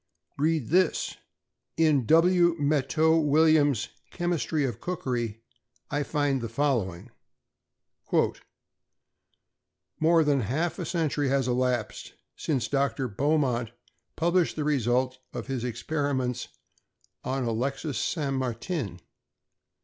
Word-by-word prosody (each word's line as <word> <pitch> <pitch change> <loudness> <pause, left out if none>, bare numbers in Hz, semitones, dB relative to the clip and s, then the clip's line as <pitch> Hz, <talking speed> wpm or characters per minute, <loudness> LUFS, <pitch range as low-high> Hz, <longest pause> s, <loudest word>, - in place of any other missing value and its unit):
=Read 155 -4 +1
this!= 180 +1 +1 0.6
In 150 -7 +3
W. 175 +1 +5
Mattieu 155 +2 +2
Williams's 145 -5 +3 0.2
"Chemistry 170 -4 -1
of 120 -3 -4
Cookery," 120 -10 -3 0.5
I 145 0 0
find 145 -2 0
the 115 - -4
following: 115 -6 -1 2.9
"More 165 +1 +4
than 145 -2 +2
half 145 - -1
a 175 - -3
century 155 -5 0
has 135 -1 +1
elapsed 125 -2 -1 0.2
since 130 -7 -1
Dr. 140 -1 0
Beaumont 125 -1 0 0.4
published 170 +1 +1
the 155 - -2
results 130 -2 +1
of - - -5
his 130 -3 -3
experiments 125 0 -2 0.8
on 130 0 -2
Alexis 130 +5 -2
St. 145 -5 -1
Martin. 125 - -3
140 Hz, 100 wpm, -27 LUFS, 125-155 Hz, 2.9 s, W